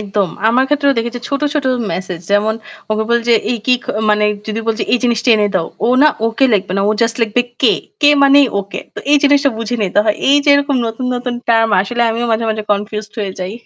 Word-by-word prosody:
একদম। 200 -2 -1 0.2
আমার 255 +3 +3
ক্ষেত্রেও 280 -2 +1
দেখি 230 +1 -1
যে 245 - -7
ছোট, 280 0 -2
ছোট 290 -3 -1 0.3
মেসেজ। 180 -2 -5
যেমন 210 +2 +2 0.4
ওকে 215 0 0
বলি 235 0 +2
যে - - +6 0.2
এ - - 0
কি 255 - +4 0.4
মানে 210 0 +2 0.2
যদি 220 +1 -3
বলছি 225 0 -1
"এই 245 - +4
জিনিসটা 240 +1 0
এনে 205 -1 +1
দাও।" 170 -3 0 0.2
ও - - +1
না 305 - +7 0.2
ওকে 230 +4 0
লিখবে 195 -2 0
না। - - +1
ও - - +3
জাস্ট 230 -1 0
লিখবে 225 +2 +1 0.2
"কে" - - +5 0.3
কে 290 -1 +6
মানেই 280 0 +6
ওকে। 200 0 -8
তো - - -7
এই 295 - +6
জিনিসটা 285 -1 +3
বুঝে 230 +2 -3
নিতে 200 +1 0
হয়। 210 -1 +1
এই 285 - +5
যে - - 0
এরকম 285 -1 +1
নতুন, 225 +3 -4
নতুন 245 0 -4
টার্ম 225 -1 +3
আসলে 240 +5 -2
আমিও 235 +2 -2
মাঝে, 225 +1 0
মাঝে 215 0 -3
কনফিউজড 210 +1 -4
হয়ে 195 -2 -3
যাই। 185 +2 -4
225 Hz, 230 wpm, -15 LUFS, 210-255 Hz, 0.4 s, না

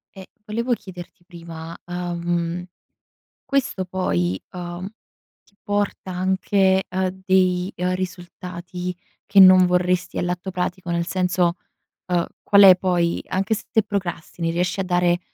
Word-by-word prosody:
E 190 -1 -10 0.2
volevo 235 +3 -1
chiederti 180 -5 -9
prima, 165 -2 -9
ahm, 175 0 -3 0.8
questo 270 -8 -1
poi, 95 - -1
uhm, 175 +1 -6 0.6
ti 200 - -31
porta 205 -2 -2
anche 190 +1 +2
a 185 0 -1
dei, 185 0 +1
ehm, 180 +1 0
risultati 180 0 -6 0.3
che 200 0 +2
non 185 -1 +9
vorresti 180 0 0
all'atto 180 +2 -2
pratico? 180 0 -3
Nel 170 0 0
senso, 180 -2 +1 0.5
ehm, 175 -2 0 0.2
qual 200 0 +5
è 190 -2 +10
poi 175 -2 0
anche 195 +4 0
se 210 - -7
te 220 - +4
procrastini, 175 -4 -3
riesci 180 +3 -1
a - - +1
dare, 175 -1 +2
180 Hz, 130 wpm, -22 LUFS, 175-190 Hz, 0.8 s, è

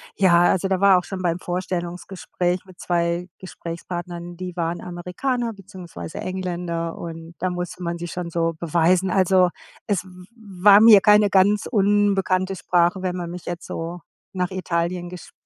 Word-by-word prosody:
ja, 175 -3 +5
also 185 +2 +2
da 190 -1 0
war 195 -1 +6
auch - - -8
schon 190 -2 -6
beim 170 0 0
Vorstellungsgespräch 180 0 -3
mit 185 -2 -17
2 170 0 -1
Gesprächspartnern 175 -1 -7
die 180 -1 -6
waren 170 0 -2
Amerikaner, 225 +8 -3
beziehungsweise 185 -4 -9
Engländer 175 -3 -3
und 165 0 -8
da 185 - 0
musste 180 0 -5
man 170 -1 -3
sich 175 0 -6
schon 180 -1 -5
so 165 0 0
beweisen. 175 +3 +2
Also, 185 -1 +4 0.4
es 200 -4 0
w 190 - -15 0.5
war 205 0 +8
mir 220 -3 +9
keine 210 -1 +5
ganz 200 +2 +3
unbekannte 195 -3 +1
Sprache. 175 0 +1
Wenn 185 -1 -2
man 175 -2 -5
mich 175 0 -8
jetzt 175 0 -5
so 170 +2 -5 0.3
nach 180 -1 -2
Italien 175 -1 -2
gesch 180 0 -11
180 Hz, 160 wpm, -22 LUFS, 175-190 Hz, 0.5 s, mir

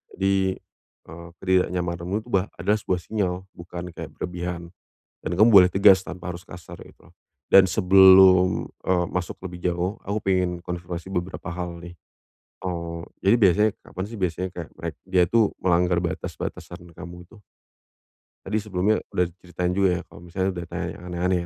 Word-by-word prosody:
Jadi, 95 0 +1 0.8
eee, 85 +1 -10
ketidaknyamananmu 90 -1 -1
itu 125 - -14
bah 95 +1 +2
adalah 105 +1 +1
sebuah 90 - -1
sinyal, 100 -5 -1 0.2
bukan 85 +1 -8
kayak - - -7
berlebihan. 90 -1 -5 0.5
Dan - - -2
kamu 110 +2 +7
boleh 95 -4 +8
tegas 95 -1 +6
tanpa 90 0 -7
harus 90 - -11
kasar, 90 0 -11
kayak - - -13
gitu. - - -23 0.4
Dan 95 -1 +8
sebelum, 95 -1 +6 0.2
eee, 90 -1 +1
masuk 90 -2 -4
lebih 90 0 -3
jauh, 90 +4 -2
aku 100 +2 -2
pengen 90 -2 0
konfirmasi 85 0 -6
beberapa 90 -2 -4
hal 85 0 -5
nih. 85 +1 -10 0.6
Eee, 85 -2 -4 0.2
jadi 100 +5 +5
biasanya 105 +2 +4
kapan 95 - -6
sih 115 0 -9
biasanya 90 0 -1
kayak 85 -3 -8
merek 85 -3 -5
dia 90 -1 +3
itu 115 +5 +2 0.2
melanggar 90 0 +2
batas-batasan 85 +1 -6
kamu 90 0 -10
itu? 110 - -17 1.1
Tadi 105 +3 -1
sebelumnya 105 +1 0
udah 90 - +1
diceritain 90 -1 -3
juga 100 -1 +3
ya - - -6
kalau - - -15
misalnya 95 +2 -2
udah 85 0 -5
tanya - - -4
yang - - -13
aneh-aneh 90 +1 0
90 Hz, 160 wpm, -24 LUFS, 85-95 Hz, 1.1 s, boleh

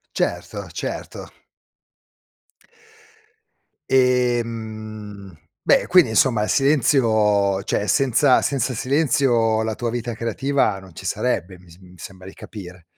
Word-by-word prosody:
Certo, - - -3
certo. - - -6 2.6
Ehm, 110 -6 -1 0.3
beh, - - +3
quindi, 175 -9 +5
insomma, 115 -1 +2
il 105 - -1
silenzio 110 -8 +2
cioè 105 - -2
senza 130 +4 +3
senza 135 -2 -1
silenzio 125 -4 +1
la 110 -1 -2
tua 120 - -3
vita 120 0 -3
creativa 115 -1 -1
non 95 -3 -15
ci - - -9
sarebbe, 90 +2 -2
mi 90 -1 -19
s 85 - -17
mi 90 -1 -17
sembra 95 +2 -11
di - - -12
capire. 90 -4 -11
110 Hz, 115 wpm, -21 LUFS, 100-125 Hz, 2.6 s, quindi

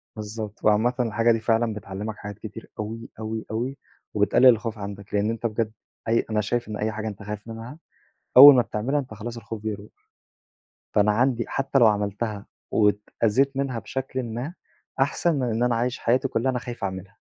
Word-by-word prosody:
بالضبط، 110 0 -6
وعامةً 110 +4 +4
الحاجة 115 0 +2
دي 115 - +2
فعلًا 115 0 +1
بتعلّمك 105 +1 -6
حاجات 105 0 -8
كتير 110 +1 -9
أوي، 115 +2 -5
أوي، 110 0 -4
أوي 125 +5 -2 0.4
وبتقلل 105 +5 +3
الخوف 115 -2 +4
عندك، 100 0 -8
لإن 105 +1 +1
أنت 115 +1 -4
بجد 110 0 -1 0.4
أي 115 +1 +2
أنا 110 -1 +1
شايف 120 +3 -1
إن 105 - -5
أي 110 +1 -1
حاجة 110 +1 -4
أنت 100 -1 -7
خايف 105 +1 -6
منها 115 +5 -8 0.6
أول 140 +2 +12
ما 125 - +5
بتعملها، 125 +8 -1
أنت 130 -5 -5
خلاص 115 +3 -6
الخوف 115 -2 -7
بيروح. 105 -1 -5 1.1
فأنا 105 0 +4
عندي 120 +2 +1
حتى 135 0 0
لو 115 - +7
عملتها 105 0 -1 0.3
واتأذيت 110 +5 +1
منها 130 -4 -1
بشكلٍ 130 0 -4
ما، 120 +8 -5 0.5
أحسن 145 +4 +2
من 135 - -1
إن 115 +1 0
أنا 125 -1 +2
عايش 120 +2 -1
حياتي 125 +3 +2
كلّها 130 +1 0
أنا 125 - -2
خايف 120 -2 -7
اعملها. 95 +1 -5
115 Hz, 180 wpm, -25 LUFS, 105-125 Hz, 1.1 s, أول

